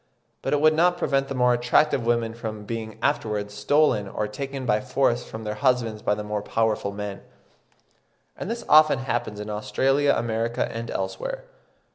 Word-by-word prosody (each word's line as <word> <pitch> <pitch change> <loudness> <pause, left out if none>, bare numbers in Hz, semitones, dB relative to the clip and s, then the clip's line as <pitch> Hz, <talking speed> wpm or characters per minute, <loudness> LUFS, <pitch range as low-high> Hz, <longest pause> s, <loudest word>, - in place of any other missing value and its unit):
But - - -2
it 145 - +2
would 155 0 +6
not 175 +3 +3
prevent 135 -4 0
the 135 - -4
more 125 -1 +4
attractive 120 +3 +2
women 115 -1 +1
from 110 -2 -6
being 110 -1 -5
afterwards 105 -7 -1
stolen 105 0 +2
or 105 +2 -3
taken 135 +5 -5
by 105 -2 +2
force 125 -1 +1
from 110 0 -8
their 105 -1 -3
husbands 120 -3 0
by 105 - +1
the 105 - -5
more 105 0 -3
powerful 110 -2 0
men; 100 -1 -6 1.1
and 190 - -6
this 235 +1 -4
often 155 -2 +6
happens 120 -4 -3
in 105 - -6
Australia, 135 +7 +1
America, 115 0 -1
and 115 +1 -5
elsewhere. 95 0 -4
115 Hz, 170 wpm, -25 LUFS, 105-135 Hz, 1.1 s, would